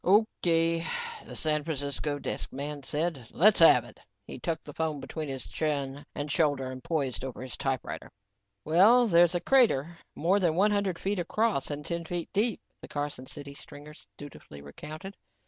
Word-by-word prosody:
"O.K.," 165 -5 +3 0.4
the - - -8
San 150 -1 +1
Francisco 145 -1 -3
desk - - -4
man 145 +1 -5
said, 145 -2 -2
"let's 210 +4 +5
have 125 -7 +7
it." - - -15 0.3
He - - -8
tucked 165 +4 -3
the 145 - -9
phone 155 -2 -2
between 145 -2 -5
chin 145 0 -3
and 145 0 -3
shoulder 140 -4 +1
and 130 -1 -9
poised 140 -7 -1
over 130 -2 -6
his 130 - -7
typewriter. 135 -2 -3 0.6
"Well, 205 +10 +6
there's 175 -3 +5
a - - +2
crater 175 - +3 0.2
more 185 +5 +2
than 170 -4 +2
one 205 +4 +4
hundred 200 -4 0
feet 195 +1 -1
across 210 -2 0
and 145 0 -5
ten 170 -1 -3
feet 175 0 -3
deep," 215 +2 +2 0.2
the - - -9
Carson 145 -3 -4
City 145 -1 -8
stringer 145 +1 -10 0.2
dutifully 105 - -11
recounted. 155 - -9
155 Hz, 165 wpm, -29 LUFS, 140-175 Hz, 0.6 s, have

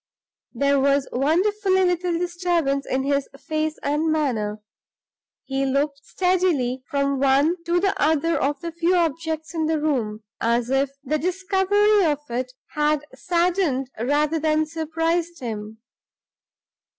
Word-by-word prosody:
There 280 +3 +2
was 275 0 +2
wonderfully 375 +7 +2
little 355 -1 0
disturbance 345 -5 0
in 265 +1 0
his 280 0 0 0.2
face 310 0 -1
and 300 +3 +1
manner; 225 -9 -1 0.8
he 270 0 -2
looked 280 +2 0
steadily 345 -10 +1
from 280 -1 0
one 280 +6 +2
to 345 +1 +2
the 390 +1 +1
other 320 +2 +2
of 285 +1 0
the 335 - -4
few 340 +2 +1
objects 320 -1 -1
in 320 -2 0
the 320 -1 +1
room, 230 -8 -1 0.2
as 235 +2 +1
if 270 +1 +2
the 305 +3 -1
discovery 385 +4 +2
of 300 -4 +2
it 255 +1 -2 0.2
had 300 0 +1
saddened 340 -7 0
rather 295 +6 +1
than 310 0 +2
surprised 330 +2 -2
him. 220 -3 -6
310 Hz, 130 wpm, -23 LUFS, 275-345 Hz, 0.8 s, There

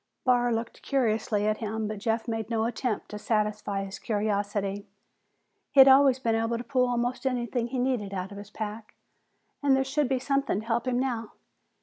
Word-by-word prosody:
Barr 245 -1 +3
looked 230 +1 -3
curiously 220 -5 0
at 215 0 +1
him 220 0 -3
but 215 -1 -5
Jeff 225 +2 -1
made 225 -1 -3
no 225 -1 0
attempt 235 -1 -2
to 210 - -6
satisfy 210 -2 -1
his 195 - -8
curiosity. 205 -1 -1 0.9
He'd 270 -1 +9
always 270 -1 +7
been 235 -3 0
able 225 +1 0
to 235 - -5
pull 255 -1 +1
almost 245 0 -1
anything 245 -2 -1
he 255 +2 -4
needed 245 -6 0
out 190 0 -4
of 200 - -8
his 205 0 -10
pack 215 +1 -6 0.7
and 280 -2 +4
there 265 - +2
should 270 0 0
be 265 - +2
something 275 -5 0
to - - -12
help 235 +2 -1
him 250 -1 +1
now. 240 -4 -2
230 Hz, 190 wpm, -27 LUFS, 210-255 Hz, 0.9 s, He'd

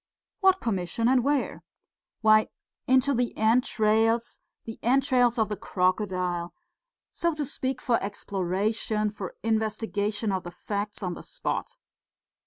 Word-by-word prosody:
"What 380 -2 +4
commission 200 +1 -1
and 255 -1 +4
where?" 285 +1 0 0.6
"Why, 215 -1 +5 0.4
into 260 +2 +4
the 245 -1 -1
entrails, 225 0 +2 0.3
the 225 - -7
entrails 250 -1 +3
of 220 -2 +2
the 210 - -3
crocodile.... 185 -2 -1 0.6
So 340 -2 -1
to 300 -1 -2
speak, 260 -1 -3
for 235 -2 +1
exploration, 205 +2 -1
for 200 -3 -7
investigation 215 -1 -1
of 190 -1 -1
the 175 - -7
facts 205 +4 -4
on 180 -1 -2
the - - -8
spot. - - -4
220 Hz, 125 wpm, -27 LUFS, 200-245 Hz, 0.6 s, Why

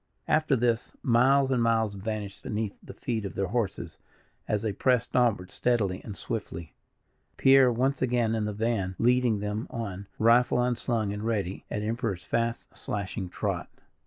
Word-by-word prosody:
After 155 -2 +3
this, 120 -1 0
miles 130 +3 +4
and 125 -2 +2
miles 115 -2 +2
vanished 100 0 -5
beneath 105 -1 -3
the - - -11
feet 115 -4 -3
of 100 - -6
their 100 - 0
horses, 110 -3 -2 0.5
as 105 0 0
they 110 -3 -1
pressed 125 +3 +1
onward 115 -7 +2
steadily 105 -7 0
and 100 -3 -8
swiftly; 85 -5 -5 0.6
Pierre, 135 -1 +6
once 130 +3 0
again 120 -3 +1
in 110 -2 0
the 105 - -2
van, 105 -3 -1
leading 120 -3 +2
them 105 +2 -3
on, 100 -5 -5
rifle 120 +2 +4
unslung 120 -4 0
and 105 - -5
ready, 100 -5 -2
at 105 - -3
Emperor's 110 -4 -2
fast 115 0 -2
slashing 100 -1 -4
trot. - - -3
115 Hz, 160 wpm, -28 LUFS, 100-120 Hz, 0.6 s, Pierre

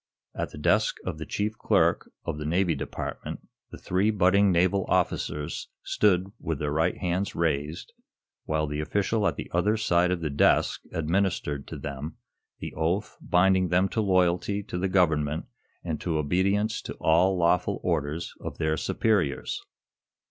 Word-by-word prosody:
At - - -3
the - - -11
desk 75 - +2
of 80 - -4
the 80 - -6
chief 105 +6 -2
clerk - - +2 0.2
of 75 - -3
the 75 - -4
Navy 90 +1 +2
Department 70 - -6 0.2
the - - -9
three 95 +4 +1
budding 100 -1 +4
naval 95 +2 +3
officers 85 -4 -1 0.2
stood 95 -2 +2
with 80 -2 -2
their 75 +1 -2
right 80 +4 +1
hands 90 +1 -1
raised 80 - -2 0.5
while 75 0 0
the 75 0 -4
official 100 +7 0
at - - 0
the - - -6
other 105 +6 +2
side 90 -5 +2
of 90 -2 -1
the 75 -3 -2
desk 70 - +3
administered 80 -4 -1
to - - -6
them 70 +3 -6 0.4
the - - -7
oath 85 +6 -1
binding 95 +1 +3
them 90 +2 +3
to 110 - 0
loyalty 95 +1 +2
to 90 - -5
the 95 +1 0
government 80 -5 +2 0.4
and 80 -3 -3
to 85 -3 -1
obedience 100 +8 +1
to - - -7
all 90 +4 +3
lawful 85 0 +2
orders 75 +4 -1
of - - -6
their 80 0 0
superiors. 100 -11 0
90 Hz, 160 wpm, -27 LUFS, 80-95 Hz, 0.5 s, budding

